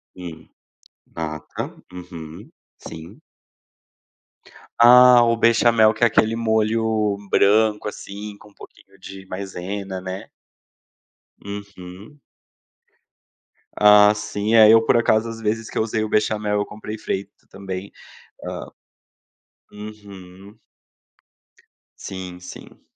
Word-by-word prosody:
Hum, 85 Hz, -3 st, -10 dB, 0.7 s
nata, 75 Hz, -2 st, -5 dB, 0.3 s
uhum, 90 Hz, -, -10 dB, 0.3 s
sim. 85 Hz, -, -11 dB, 1.6 s
Ah, 125 Hz, +1 st, +8 dB
o 115 Hz, -1 st, +1 dB
bechamel 115 Hz, -1 st, +4 dB
que 110 Hz, -, -3 dB
é 120 Hz, -, +7 dB
aquele 110 Hz, +1 st, +1 dB
molho 110 Hz, -2 st, 0 dB
branco, 105 Hz, +2 st, +2 dB
assim, 105 Hz, 0 st, -8 dB
com 105 Hz, -, -17 dB
um -, -, -26 dB
pouquinho 95 Hz, 0 st, -17 dB
de 95 Hz, 0 st, -11 dB
maisena, 95 Hz, 0 st, -6 dB
né? 95 Hz, +1 st, -7 dB, 1.1 s
Uhum. 100 Hz, +5 st, -10 dB, 1.6 s
Ah, 105 Hz, 0 st, +7 dB
sim, 105 Hz, +1 st, -3 dB
é 110 Hz, -1 st, +8 dB
eu 115 Hz, 0 st, +6 dB
por -, -, +3 dB
acaso 115 Hz, -1 st, +1 dB
às 115 Hz, 0 st, -8 dB
vezes 110 Hz, 0 st, -3 dB
que -, -, -7 dB
eu -, -, +2 dB
usei 110 Hz, 0 st, -2 dB
o 110 Hz, -, -4 dB
bechamel 105 Hz, -1 st, 0 dB
eu 105 Hz, -, -1 dB
comprei 105 Hz, +1 st, -8 dB
feito 100 Hz, -1 st, -6 dB
também. 95 Hz, 0 st, -7 dB, 0.5 s
Hã -, -, -6 dB, 1.0 s
Uhum. 100 Hz, -1 st, -12 dB, 1.5 s
Sim, 95 Hz, -2 st, -7 dB
sim. 90 Hz, -, -12 dB
105 Hz, 105 wpm, -21 LUFS, 95-110 Hz, 1.6 s, Ah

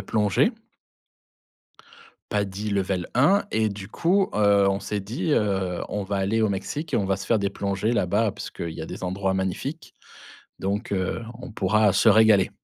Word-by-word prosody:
plongée. 105 Hz, -, +2 dB, 1.8 s
PADI 105 Hz, 0 st, -2 dB
level 95 Hz, -3 st, -1 dB
1 175 Hz, +11 st, +4 dB
et 110 Hz, 0 st, +1 dB
du 100 Hz, -1 st, -7 dB
coup, 185 Hz, -, +1 dB
heu, 100 Hz, -1 st, +4 dB
on 100 Hz, 0 st, 0 dB
s'est 105 Hz, -, -3 dB
dit, 115 Hz, +10 st, -2 dB
heu: 95 Hz, -6 st, 0 dB
«On 105 Hz, -, -3 dB
va 100 Hz, +1 st, -2 dB
aller 100 Hz, +4 st, 0 dB
au 110 Hz, -, +3 dB
Mexique 145 Hz, -, -4 dB
et -, -, +4 dB
on 100 Hz, -, +1 dB
va 95 Hz, 0 st, 0 dB
se 95 Hz, -, -8 dB
faire 115 Hz, -, +3 dB
des 100 Hz, -1 st, -1 dB
plongées 100 Hz, +3 st, -1 dB
là-bas 105 Hz, +1 st, +1 dB
puisque -, -, -9 dB
il 85 Hz, -, -3 dB
y -, -, -7 dB
a -, -, -6 dB
des -, -, -7 dB
endroits 95 Hz, +1 st, -1 dB
magnifiques 95 Hz, -, -4 dB, 0.7 s
donc, 100 Hz, +4 st, -2 dB
heu, 95 Hz, +3 st, -1 dB, 0.2 s
on 125 Hz, -, -8 dB
pourra 105 Hz, 0 st, +2 dB
se 115 Hz, -, +5 dB
régaler». 110 Hz, -2 st, +5 dB
100 Hz, 180 wpm, -24 LUFS, 95-110 Hz, 1.8 s, se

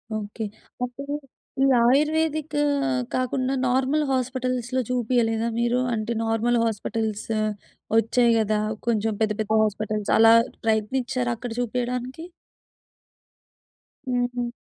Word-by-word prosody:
Okay. 215 Hz, +1 st, -5 dB, 0.4 s
అప్పుడు 280 Hz, +4 st, -5 dB, 0.5 s
ఈ -, -, +6 dB, 0.2 s
ayurvedic 305 Hz, +3 st, +2 dB, 0.6 s
కాకుండా 255 Hz, +1 st, 0 dB
నార్మల్ 265 Hz, +4 st, +2 dB
హాస్పిటల్స్‌లో 255 Hz, 0 st, -1 dB
చూపియలేదా 235 Hz, -2 st, +1 dB
మీరు? 240 Hz, +1 st, +2 dB
అంటే 220 Hz, +1 st, -2 dB
నార్మల్ 225 Hz, +2 st, +1 dB
హాస్పిటల్స్ 220 Hz, -1 st, -2 dB, 0.7 s
ఒచ్చాయి 235 Hz, +2 st, +3 dB
గదా! 215 Hz, -1 st, +1 dB, 0.3 s
కొంచెం 220 Hz, -1 st, +1 dB
పెద్ద 215 Hz, -1 st, +2 dB
పెద్ద 215 Hz, -, -4 dB
హాస్పిటల్స్ 215 Hz, 0 st, -2 dB
అలా 225 Hz, 0 st, +7 dB, 0.3 s
ప్రయత్నిచ్చారా 245 Hz, +3 st, 0 dB
అక్కడ 245 Hz, +1 st, -6 dB
చూపియడానికి? 250 Hz, +5 st, -3 dB, 1.8 s
హుహు. 245 Hz, -1 st, -1 dB
245 Hz, 95 wpm, -24 LUFS, 225-255 Hz, 1.8 s, అలా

